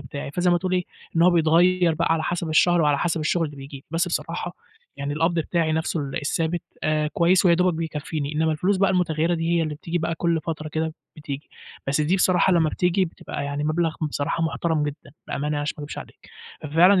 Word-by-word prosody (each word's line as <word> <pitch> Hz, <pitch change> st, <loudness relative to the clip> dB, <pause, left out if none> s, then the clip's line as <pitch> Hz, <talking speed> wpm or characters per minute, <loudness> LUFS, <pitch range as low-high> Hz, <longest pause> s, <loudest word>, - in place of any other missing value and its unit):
بتاعي. 140 Hz, +1 st, -6 dB
فزي 180 Hz, +4 st, +1 dB
ما 175 Hz, -, +4 dB
تقول 185 Hz, 0 st, -3 dB
إيه، 180 Hz, -1 st, +1 dB, 0.3 s
إن 165 Hz, -, +5 dB
هو 180 Hz, -, +6 dB
بيتغيّر 170 Hz, +1 st, +4 dB
بقى 165 Hz, 0 st, +1 dB
على 160 Hz, -1 st, 0 dB
حسب 175 Hz, 0 st, -2 dB
الشهر 175 Hz, +2 st, +4 dB
وعلى 145 Hz, -2 st, +3 dB
حسب 165 Hz, -2 st, 0 dB
الشغل 165 Hz, +2 st, +1 dB
اللي 145 Hz, -1 st, -10 dB
بييجي. 135 Hz, 0 st, -10 dB
بس 170 Hz, +2 st, 0 dB
بصراحة، 175 Hz, +1 st, -3 dB, 0.4 s
يعني 140 Hz, +1 st, -3 dB
القبض 165 Hz, +3 st, +1 dB
بتاعي 165 Hz, 0 st, 0 dB
نفسه 160 Hz, +1 st, -1 dB
ال 140 Hz, -2 st, -5 dB
الثابت، 160 Hz, +3 st, -1 dB, 0.2 s
آآ، 155 Hz, 0 st, +1 dB
كويس 175 Hz, +2 st, +3 dB
ويا 170 Hz, -, +6 dB
دوبك 180 Hz, 0 st, +2 dB
بيكفيني، 155 Hz, -2 st, -3 dB
إنّما 160 Hz, +1 st, +2 dB
الفلوس 185 Hz, +6 st, +1 dB
بقى 195 Hz, +1 st, +3 dB
المتغيّرة 170 Hz, -2 st, +1 dB
دي 165 Hz, 0 st, -1 dB
هي 165 Hz, -, +2 dB
اللي 155 Hz, -1 st, -2 dB
بتيجي 170 Hz, +3 st, -3 dB
بقى 165 Hz, +1 st, -1 dB
كل 170 Hz, -1 st, 0 dB
فترة 155 Hz, 0 st, -4 dB
كده 160 Hz, +1 st, -2 dB, 0.2 s
بتيجي، 145 Hz, -1 st, -7 dB, 0.4 s
بس 140 Hz, +2 st, +1 dB
دي 165 Hz, +6 st, +2 dB
بصراحة 185 Hz, 0 st, +3 dB
لما 165 Hz, -2 st, +3 dB
بتيجي 180 Hz, +4 st, +1 dB
بتبقى 160 Hz, -4 st, -6 dB
يعني 145 Hz, +1 st, -3 dB
مبلغ 160 Hz, +1 st, 0 dB
بصراحة 155 Hz, +1 st, -1 dB
محترم 160 Hz, -1 st, 0 dB
جدًا، 145 Hz, -1 st, -5 dB, 0.2 s
بأمانة 140 Hz, -, -3 dB
يعني 150 Hz, 0 st, -1 dB
عشان 145 Hz, +1 st, -2 dB
ما 145 Hz, -, -5 dB
اكدبش -, -, -7 dB
عليك. -, -, -12 dB, 0.3 s
ففعلًا 175 Hz, +6 st, +5 dB
160 Hz, 215 wpm, -24 LUFS, 150-175 Hz, 0.4 s, هو